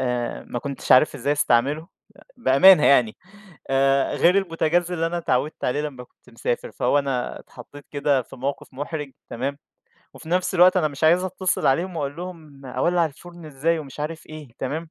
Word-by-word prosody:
آآ، 125 -2 -2
ما 120 - -3
كنتش 140 +2 -1
عارف 130 +4 +5
إزاي 145 - -1
أستعملُه، 145 +3 +1 0.5
بأمانة 150 +4 +6
يعني، 125 -6 +4 0.5
آآ، 135 0 +2
غير 180 +3 +4
البوتاجاز 175 -1 0
اللي 165 -1 0
أنا 175 +1 -2
اتعوِّدت 145 -2 -1
عليه 125 +4 0
لمّا 135 -5 -6
كنت - - -24
مسافر، 120 +1 -3
فهو 130 +4 +1
أنا 135 -3 -2
اتحطيت 140 +3 -14
كده 140 -2 +1
في 125 - -14
موقف 135 +2 -4
محرج 145 +1 -5 0.2
تمام، 140 +4 -3 0.6
وفي 160 - -12
نفس 180 +2 0
الوقت 180 +1 +6
أنا 165 -4 +2
مش 145 +1 -4
عايز 175 +3 +4
أتصل 185 0 -1
عليهم 170 +6 +1
وأقول 145 -2 -3
لهم 160 -6 -10
أولّع 170 +7 +1
الفرن 170 +3 -13
إزاي، 155 +3 -1
ومش 145 -2 -9
عارف 155 +2 -5
إيه، 155 -2 -10
تمام. 155 +5 -4
150 Hz, 175 wpm, -23 LUFS, 135-170 Hz, 0.6 s, بأمانة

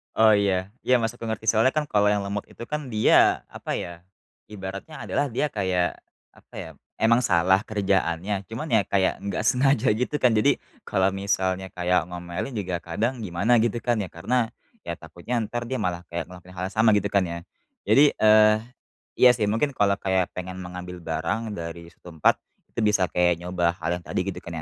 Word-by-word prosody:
Oh 110 0 +6
iya, 95 -2 0 0.2
iya 130 - +3
maksudku 115 +1 -3
ngerti 110 0 -1
soalnya, 115 +4 +3
kan, 150 -2 -1
kalau 105 -1 +3
yang 105 0 +2
lemot 100 +1 -4
itu, 115 - -11
kan, 150 -1 -3
dia 110 -4 +4
apa, - - -5
ya, 85 0 -6 0.4
ibaratnya 100 +8 -8
adalah 145 - +1
dia 140 +3 -1
kayak 95 -6 -1 0.3
apa, - - -25
ya, - - -7 0.3
emang 115 +1 +5
salah 95 +2 +3
kerjaannya, 95 -1 -1
cuman, 115 +9 -6
ya, - - +4
kayak 95 -1 +1
enggak 100 -1 -3
sengaja 125 +2 +3
gitu 115 +7 0
kan 125 - +5
jadi 105 - +3 0.2
kalau 95 0 +2
misalnya 95 -1 -1
kayak 90 0 +1
ngomelin 90 +7 -6
juga 95 -5 -2
kadang 110 +8 -3
gimana 100 +7 +2
gitu, 115 +1 +1
kan, 120 -1 +1
ya, 105 - -1
karena, 115 +7 -1 0.3
ya, - - -3
takutnya 85 +8 -8 0.2
ntar 120 0 -3
dia 130 0 -3
malah 90 -2 -2
kayak 85 +1 -3
ngelakuin 90 0 -13
hal - - -2
yang - - -17
sama 110 -1 +5
gitu, 100 -1 +1
kan, 100 -2 +2
ya. 85 0 -5 0.4
Jadi, 145 +1 +5
eee, 110 0 +6 0.6
iya 125 - +8
sih 110 -4 0
mungkin 125 +7 0
kalau 100 -4 +2
kayak 95 -2 0
pengen 90 0 -5
mengambil 90 0 -8
barang 95 +7 -3
dari 85 0 -7
suatu - - -35
tempat 80 -4 +2 0.3
itu 115 - -4
bisa 105 -3 +3
kayak 90 -1 +2
nyoba 90 -1 0
hal 85 +2 -1
yang 85 - -15
tadi - - -1
gitu, - - -6
kan, 85 -2 -7
100 Hz, 190 wpm, -25 LUFS, 90-115 Hz, 0.6 s, iya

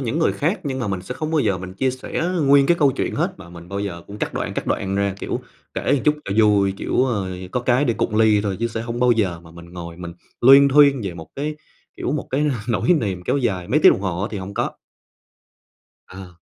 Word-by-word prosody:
những 135 +4 -2
người 165 - +2
khác, 175 +7 -1
nhưng 135 -2 -3
mà 120 -5 -2
mình 95 -2 -2
sẽ 125 - -6
không 155 +3 -4
bao 160 - +1
giờ 100 -7 0
mình 95 0 -8
chia 130 +6 0
sẻ 130 +4 -4 0.2
nguyên 140 0 +6
cái 170 - +3
câu 140 -2 +4
chuyện - - -2
hết. - - -1
Mà - - -12
mình 85 0 -12
bao 100 0 -4
giờ 90 -4 -5
cũng 105 +1 -10
cắt - - -3
đoạn, - - -3
cắt - - -4
đoạn 95 0 -1
ra, 100 -1 0
kiểu, - - -3 0.3
kể - - -2
một 140 - +1
chút 150 - +4
cho 100 - -3
vui, 100 -2 +3
kiểu, 125 - 0
ơ, 105 -7 -1 0.2
có 125 - 0
cái 125 +3 +2
để 120 - +1
cụng 110 - -1
ly 110 -1 +4
thôi, 100 -2 -2
chứ 115 - +1
sẽ 110 0 -4
hông 115 +1 -5
bao 125 -1 +5
giờ 95 -7 -1
mà 85 -1 -16
mình 85 +1 -13
ngồi 85 -1 -8
mình 85 -1 -7 0.3
luyên 135 +3 +8
thuyên 140 -1 +5
về 95 -4 -4
một 80 -2 -10
cái, 150 +2 -3 0.4
kiểu, - - -2
một 150 - -3
cái 145 +3 +1 0.2
nỗi 115 - 0
niềm 100 - -1
kéo - - +1
dài 100 -10 -1
mấy 150 +4 +2
tiếng - - +8
đồng - - -3
hồ 95 -2 -2
á, 105 - -2
thì 105 - -4
hổng 95 +1 -7
có. - - -1 1.4
Ờ. 95 -1 -11
110 Hz, 260 wpm, -21 LUFS, 95-135 Hz, 1.4 s, luyên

